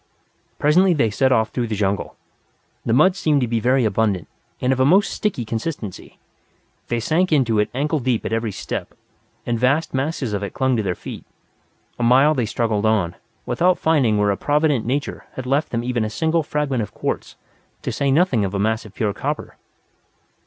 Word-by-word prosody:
Presently 175 +5 +4
they 115 -7 +2
set 130 +5 +2
off 110 -3 +3
through 120 -2 -2
the 110 - -2
jungle. 100 -1 -1 0.7
The - - -1
mud 155 +10 +5
seemed 155 -7 +2
to 125 - +1
be 115 0 0
very 125 +2 +2
abundant, 105 -4 0 0.3
and 130 +1 +2
of 130 - -3
a - - +5
most 185 +9 +4
sticky 185 - -2
consistence. 110 - -4 0.9
They 120 - -1
sank 165 +10 +1
into 120 -8 +3
it 105 - +1
ankle 150 +4 -1
deep 125 -3 -1
at - - -2
every 115 -1 -1
step, - - -5 0.5
and 120 -1 -1
vast 140 +6 +1
masses 135 -4 -2
of 100 - -1
it 100 - -5
clung 130 -1 +1
to 110 - +1
their 95 -4 -2
feet. - - -8 0.8
A - - 0
mile 130 +6 +5
they 125 -6 -1
struggled 110 -1 0
on, 100 -6 +1 0.3
without 180 +1 +2
finding 135 -10 +2
where 105 0 +2
a 100 - -2
provident 145 -5 +1
nature 140 +3 -2
had 130 - -6
left 140 +4 +1
them 115 0 -2
even 120 -2 -1
a 110 - -2
single 160 +8 +1
fragment 145 -4 -1
of 105 - -6
quartz, - - -3 0.5
to - - -2
say 140 - 0
nothing 135 - +3
of 100 0 -2
a - - -1
mass 110 +2 0
of 105 - -13
pure 105 -3 0
copper. - - -4
125 Hz, 195 wpm, -21 LUFS, 110-145 Hz, 0.9 s, mud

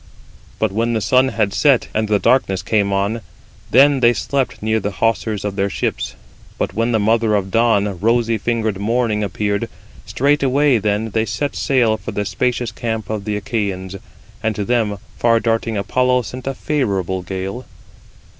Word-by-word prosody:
But 110 -3 0
when 115 +3 0
the 110 - +1
sun 130 +6 +3
had 105 -6 0
set, 125 +6 +3
and 110 0 0 0.2
darkness 95 -8 +2
came 100 -2 +1
on, 100 +4 0 0.5
then 140 +2 +5
they 120 -1 +5
slept 130 -3 -2
near 110 0 +1
the 105 -1 -3
hawsers 110 -1 -1
of 100 -1 -3
their 100 0 0
ships. - - -3 0.4
But - - -2
when 115 +4 0
the 115 - +3
mother 110 +1 +2
of 95 -2 -1
dawn, 115 -2 +3
55 100 -2 -5
rosy 115 0 +2
fingered 110 -3 -1
morning, 110 0 0
appeared, 100 +3 -2 0.4
straightway 140 -1 +2
then 105 +1 -1
they 110 +1 +1
set 125 +8 -2
sail 120 -5 +2
for 110 - -7
the 105 0 -2
spacious 120 +1 -1
camp 110 -3 -4
of 105 -2 -3
the 105 -1 -1
Achæans, 100 -3 -3 0.4
and 110 -2 -1
to 105 - -2
them 110 -3 0 0.2
far 115 -1 +4
darting 115 -1 0
Apollo 125 +5 +1
sent 130 +2 -8
a 135 - -2
favourable 100 - -1
gale. 95 +6 -5
110 Hz, 170 wpm, -19 LUFS, 100-120 Hz, 0.5 s, then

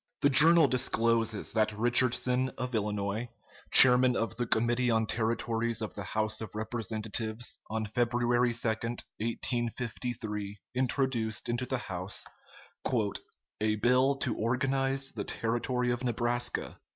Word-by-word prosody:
] - - -49
The 140 - +5
journal 160 +3 +7
discloses 115 -4 +1
that 110 -1 +1
Richardson, 125 +2 +2
of 125 0 -4
Illinois, 105 +1 -2 0.4
chairman 125 0 +7
of 115 - -2
the 120 0 -2
Committee 120 +3 +1
on 110 -1 +2
Territories 115 0 -1
of 110 -2 -4
the 100 - -6
House 110 +3 -2
of 110 -2 -7
Representatives, 110 0 -3
on 110 0 -2
February 120 +2 +1
2, 115 0 -1
1853, 115 -1 -3 0.2
introduced 125 -4 -1
into 120 +1 -1
the 130 - -1
House 95 -4 -3 1.4
"A 110 0 +2
bill 125 +5 +3
to 125 -4 -2
organize 135 +3 -1
the - - -5
Territory 120 +2 -1
of 120 +1 -3
Nebraska." 120 0 -1
120 Hz, 125 wpm, -30 LUFS, 110-125 Hz, 1.4 s, journal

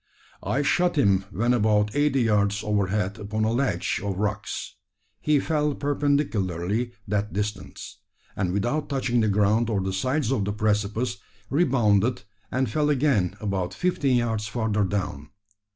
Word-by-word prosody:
I 140 - 0
shot 175 +4 +2
him 100 -7 +3
when 120 +4 +1
about 105 -2 +2
eighty 145 -3 +2
yards 105 -2 +1
overhead 100 0 0
upon 110 +1 -2
a 110 - +2
ledge 115 -8 0
of 100 -2 -2
rocks. 105 +1 -3 0.5
He 150 -1 +2
fell 150 -1 0
perpendicularly 120 - 0
that 105 +1 -1
distance, 105 +1 -5 0.4
and, 95 -3 -1
without 120 +11 -1
touching 125 -4 0
the 110 - +2
ground 105 +3 +2
or 105 -3 +1
the 95 0 -2
sides 130 +6 0
of 120 -7 +1
the 105 +1 -2
precipice, 110 +3 0 0.3
rebounded, 125 - +2 0.3
and 130 0 0
fell 150 +7 0
again 130 - +2
about 95 -3 -2
fifteen 145 -8 +1
yards 110 -3 -1
further 110 -2 0
down. 90 -7 -3
110 Hz, 145 wpm, -25 LUFS, 100-130 Hz, 0.5 s, him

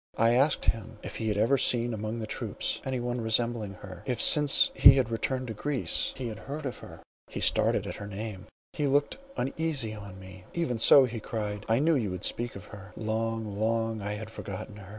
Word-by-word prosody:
I 115 +1 +4
asked 135 +4 +2
him, 115 -1 -2
if - - -7
he 110 - -3
had 105 -1 0
ever 120 +6 +3
seen 120 -1 +3
among 110 +1 -4
the 110 - -4
troops - - -3
any 130 -1 -3
one 120 0 -3
resembling 110 -2 0
her; 90 -3 -10
if 125 -3 -2
since 150 -2 +6
he 135 - +9
had 125 -4 0
returned 130 +3 -2
to - - -4
Greece 140 +4 0
he 130 - -4
had 110 - -8
heard 145 +2 -7
of 130 - -5
her? - - -12 0.2
He - - -7
started - - +1
at - - -6
her 100 - -7
name,—he 105 +7 -6
looked 145 - +1 0.2
uneasily 135 -4 -2
on 100 -3 -10
me. 95 0 -13
"Even 130 -9 -1
so," 135 +4 +8
he 115 -2 -5
cried, 105 -3 -5
"I 115 - +3
knew 160 +5 +3
you 115 -7 -1
would 90 +1 -6
speak 120 0 -1
of 100 - -10
her. 95 -3 -11
Long, 110 -1 -3
long 115 0 -1
I 105 +1 -3
had 110 +1 -7
forgotten 100 0 -8
her. 95 -2 -12
115 Hz, 210 wpm, -28 LUFS, 105-130 Hz, 0.2 s, he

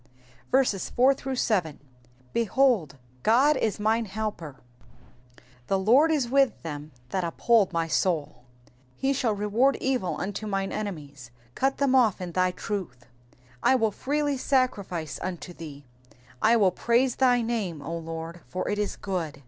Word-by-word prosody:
4 265 +1 +5 1.7
Behold, 230 - +2 0.3
God 265 - +4
is 220 -5 -1
mine 220 +2 +1
helper: 200 -8 -5 1.1
the 195 - +2
Lord 250 +12 +4
is 285 -6 +1
with 270 -1 +2
them 150 -1 -6 0.2
that 185 +4 -1
uphold 200 +4 +2
my 165 -1 -1
soul. 155 -7 -1 0.2
5 - - -28 0.2
He 270 +1 0
shall 240 -5 0
reward 215 +7 +2
evil 255 -9 -1
unto 205 +3 -4
mine 195 -1 -2
enemies: 145 - -6 0.2
cut 270 - 0
them 280 -2 +2
off 240 -7 +4
in 180 -1 -5
thy 185 +1 +2
truth. 180 - -5
6 120 - -23 0.5
I 265 - +4
will 225 -4 +2
freely 290 +5 -1
sacrifice 200 - -1
unto 175 -1 -5
thee: 145 -4 -10 0.6
I 220 +2 +5
will 195 -4 +4
praise 240 +6 +1
thy 245 -2 +3
name, 205 -10 -3
O 165 +4 -4
Lord; 165 +1 -6
for 155 +9 -4
it 205 - -1
is 210 - -1
good. 170 -7 -4
205 Hz, 145 wpm, -26 LUFS, 170-245 Hz, 1.7 s, 4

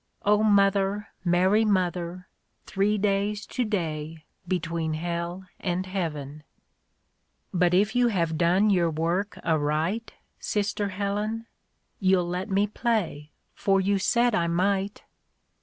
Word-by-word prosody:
(0 210 +1 +4
Mother, 200 -1 +2
Mary 185 +4 +3
Mother, 180 -3 -1 0.4
Three 205 +2 +1
days 205 +1 0
tO'day, 165 -9 -3 0.2
between 165 -3 -1
Hell 170 +3 -4
and 180 0 -2
Heaven 155 -6 -4 0.6
.') - - -47
But 180 0 +4
if 205 +5 +2
you 245 0 +4
have 170 -7 0
done 180 +6 +3
your 175 -3 +3
work 170 +6 -1
aright, 160 +7 0 0.3
Sister 205 0 -1
Helen? 205 +3 -2 0.5
You'll 185 -2 +3
let 180 +4 -3
me 200 +1 +2
play, 210 - -2 0.2
for 195 -1 +2
you 195 +1 +1
said 235 +4 +2
I 170 -4 +1
might." 195 +4 0
190 Hz, 120 wpm, -26 LUFS, 170-205 Hz, 0.6 s, 0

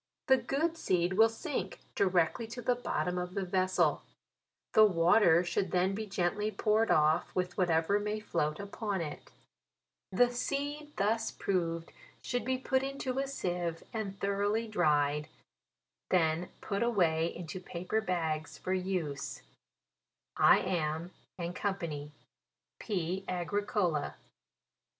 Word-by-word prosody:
The 265 - +7
good 290 +7 -1
seed 180 - +1
will 220 +4 +6
sink 225 - -4
directly 185 +4 +2
to 235 +2 -7
the 250 - +3
bot 245 0 -2
tom 180 0 -1
of 180 0 -5
the 195 -1 -1
vessel. 185 0 +2 0.7
The 215 - +8
water 175 -2 +5
should 175 +2 -1
then 185 +2 +2
be 215 +2 -4
gently 195 +2 0
poured 215 +2 +2
off, 155 +2 +3
with 180 -1 -1
whatever 175 +2 +2
may 210 +1 -2
float 150 -7 -1
upon 200 -1 -3
it. 150 -3 -6 0.8
The 245 +6 +4
seed 290 +4 -3
thus 225 +3 +1
proved 170 -3 -2 0.3
should 245 -1 -1
be 260 0 0
put 260 0 +1
into 270 -1 -3
a 275 - -1
seive, 175 -10 -3
and 200 -3 -4
thoroughly 205 +3 0
dried, 150 -6 +2 0.8
then 170 -1 +2
put 200 -1 -2
away 170 -9 +2
into 175 +1 -6
paper 180 +4 -2
bags, 160 -6 -2
for 185 - -2
use. 180 -7 -3 0.9
I - - +6
am. 170 -1 -2 0.3
fyc. 170 -4 -3 0.7
P. 190 -2 -2
AGRICOLA. 180 -3 -1
185 Hz, 125 wpm, -32 LUFS, 170-220 Hz, 0.9 s, The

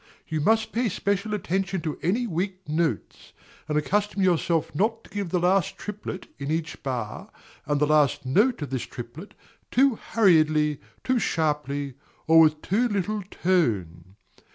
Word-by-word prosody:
You 155 -1 -2
must 220 +5 +2
pay 235 0 0
special 200 +3 -1
attention 190 -1 -1
to 155 -2 -4
any 220 +9 +1
weak 185 -1 -3
notes, 155 - -2 0.4
and 150 - +1
accustom 200 +6 0
yourself 170 -2 +1
not 220 +8 0
to - - -18
give 200 -3 -3
the 180 - +1
last 180 0 +2
triplet, 210 -2 -6
in 140 0 -4
each 160 +1 -3
bar, 120 -6 -4 0.4
and 145 0 +1
the 150 - +4
last 150 -3 +2
note 205 - +2
of 145 - -6
this 130 -2 -1
triplet, 130 - -9 0.3
too 260 -2 +3
hurriedly, 155 -8 +3 0.2
too 255 -1 +1
sharply, 150 - -1 0.3
or 165 0 +6
with 155 -1 +4
too 225 +7 +2
little 205 0 -1
tone. 95 - 0
170 Hz, 155 wpm, -25 LUFS, 150-205 Hz, 0.4 s, or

